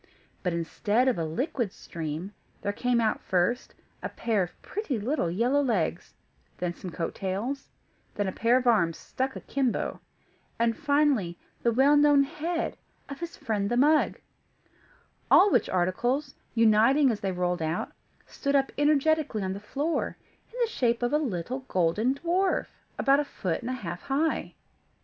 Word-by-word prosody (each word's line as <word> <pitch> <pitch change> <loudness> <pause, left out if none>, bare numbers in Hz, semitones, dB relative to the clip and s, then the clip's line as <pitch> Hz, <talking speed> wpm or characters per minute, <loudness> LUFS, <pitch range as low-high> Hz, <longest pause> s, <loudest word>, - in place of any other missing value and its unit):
But 180 - 0
instead 205 +8 0
of 245 -9 +2
a 165 - 0
liquid 230 - -2
stream, 165 +4 -6 0.3
there 205 - -1
came 245 +2 +1
out, 220 -2 +1
first, 185 +7 0 0.3
a - - -3
pair 225 -4 0
of 175 -1 -5
pretty 390 - -3
little 230 - 0
yellow 240 +11 +2
legs, 190 - -1 0.4
then 175 -1 -2
some 180 - -8
coat 165 -1 -3
tails, 210 +9 -3 0.5
then 205 -1 -1
a - - -1
pair 235 +5 +3
of 255 - -1
arms 170 -9 +3
stuck 265 +1 -3
akimbo, 265 -4 -2 0.6
and, 230 0 +2
finally, 285 - +1 0.2
the 235 - +2
well 270 +5 +5
known 290 -1 +6
head 325 +4 -3 0.3
of 280 - -7
his 340 0 -6
friend 205 -3 -1
the 240 - 0
mug; 300 +4 +4 1.1
all 400 +1 +7
which - - +2
articles, 240 +11 0 0.2
uniting 230 +5 +5
as 215 - -3
they 195 - -1
rolled 180 -1 -1
out, 160 +2 -2 0.3
stood 280 0 -2
up 270 -1 +2
energetically 295 -5 +2
on 190 0 -2
the 195 - -6
floor, 285 +10 -2 0.3
in 485 - -10
the - - +2
shape 240 - +1
of 240 +3 0
a 300 - +4
little 245 - -3
golden 190 +9 +1
dwarf, 360 +5 +1 0.3
about 275 +1 +4
a - - +2
foot 185 - -3
and 240 - -5
a - - -1
half 175 -8 -5
high. 295 +4 -1
240 Hz, 165 wpm, -27 LUFS, 190-280 Hz, 1.1 s, all